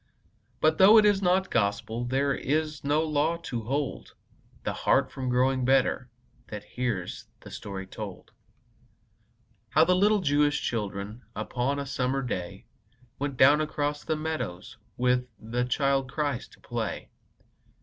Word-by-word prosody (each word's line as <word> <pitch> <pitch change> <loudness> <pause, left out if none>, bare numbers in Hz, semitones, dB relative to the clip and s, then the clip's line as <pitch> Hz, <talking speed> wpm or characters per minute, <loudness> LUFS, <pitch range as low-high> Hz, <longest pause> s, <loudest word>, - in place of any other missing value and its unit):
But 155 0 +3
though 200 +4 +9
it 215 - +7
is 205 -1 +4
not 190 +1 +2
Gospel, 110 +2 0
There 135 +3 +1
is 155 +2 -1
no 145 +3 +2
law 155 +2 +1
to 120 -6 -3
hold 140 +3 -3 0.5
The - - -2
heart - - +2
from 130 -1 -4
growing 130 +1 +2
better 130 -1 +2 0.4
That 105 -1 -7
hears 120 -8 -4
the - - -12
story 95 -1 -6
told: 95 - -8 1.4
How 155 - +5
the 180 +3 +3
little 205 +2 +3
Jewish 145 -2 +2
children 105 0 -3
Upon 125 +6 -1
a 140 - -3
summer 135 0 -1
day, 90 -8 -5 0.5
Went 140 -2 -3
down 145 +4 +6
across 145 -1 -2
the 160 - -1
meadows 155 - -4 0.2
With 125 0 +2
the 120 +3 -2
Child 135 0 +1
Christ 145 -5 -2
to - - -19
play. - - -4
135 Hz, 140 wpm, -27 LUFS, 120-155 Hz, 1.4 s, though